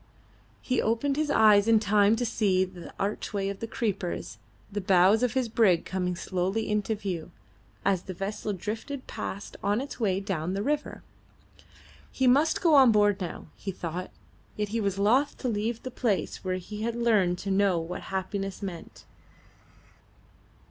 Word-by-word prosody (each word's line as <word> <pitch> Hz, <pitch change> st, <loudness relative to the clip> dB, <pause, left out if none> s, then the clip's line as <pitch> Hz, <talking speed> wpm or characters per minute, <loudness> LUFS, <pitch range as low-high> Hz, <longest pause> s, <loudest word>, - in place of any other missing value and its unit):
He 255 Hz, -2 st, +1 dB
opened 235 Hz, +5 st, 0 dB
his 305 Hz, 0 st, 0 dB
eyes 215 Hz, -4 st, +5 dB
in 225 Hz, -1 st, +6 dB
time 210 Hz, 0 st, +4 dB
to 245 Hz, +2 st, -1 dB
see 195 Hz, -5 st, +2 dB
through 185 Hz, -1 st, -12 dB
the -, -, -10 dB
archway 200 Hz, 0 st, -2 dB
of 200 Hz, +2 st, -6 dB
creepers 185 Hz, -, -3 dB, 0.3 s
the 205 Hz, +1 st, -3 dB
bows 190 Hz, +3 st, +4 dB
of 250 Hz, -1 st, 0 dB
his 260 Hz, -2 st, +1 dB
brig 210 Hz, -7 st, +3 dB
come 180 Hz, -1 st, -2 dB
slowly 190 Hz, +5 st, -2 dB
into 210 Hz, +1 st, 0 dB
view, 185 Hz, -5 st, -4 dB, 0.6 s
as 190 Hz, -3 st, +2 dB
the 185 Hz, -, -8 dB
vessel 205 Hz, +3 st, -3 dB
drifted 225 Hz, +8 st, -5 dB
past 200 Hz, +2 st, -6 dB
on 205 Hz, +2 st, +1 dB
its 275 Hz, +1 st, -6 dB
way 195 Hz, -5 st, +1 dB
down 185 Hz, -3 st, -2 dB
the 200 Hz, -, -1 dB
river. 295 Hz, +3 st, -2 dB, 1.1 s
He 265 Hz, -, 0 dB
must 280 Hz, +6 st, +4 dB
go 330 Hz, -3 st, +5 dB
on 265 Hz, -4 st, +8 dB
board 205 Hz, -2 st, +3 dB
now, 175 Hz, -2 st, -6 dB
he 200 Hz, -, -7 dB
thought; 180 Hz, 0 st, -5 dB, 0.5 s
yet 210 Hz, -1 st, -2 dB
he 225 Hz, +2 st, -1 dB
was 200 Hz, -2 st, -1 dB
loth 245 Hz, +9 st, +2 dB
to 255 Hz, -, -3 dB
leave 225 Hz, +1 st, -2 dB
the 255 Hz, -, -5 dB
place 225 Hz, -5 st, -1 dB
where 185 Hz, -1 st, -1 dB
he 210 Hz, +3 st, -7 dB
had 230 Hz, +1 st, -1 dB
learned 210 Hz, -7 st, +2 dB
to 195 Hz, +1 st, -4 dB
know 195 Hz, -2 st, +3 dB
what 165 Hz, +2 st, -4 dB
happiness 195 Hz, +1 st, -3 dB
meant. 180 Hz, -4 st, -8 dB
205 Hz, 170 wpm, -28 LUFS, 190-230 Hz, 1.1 s, on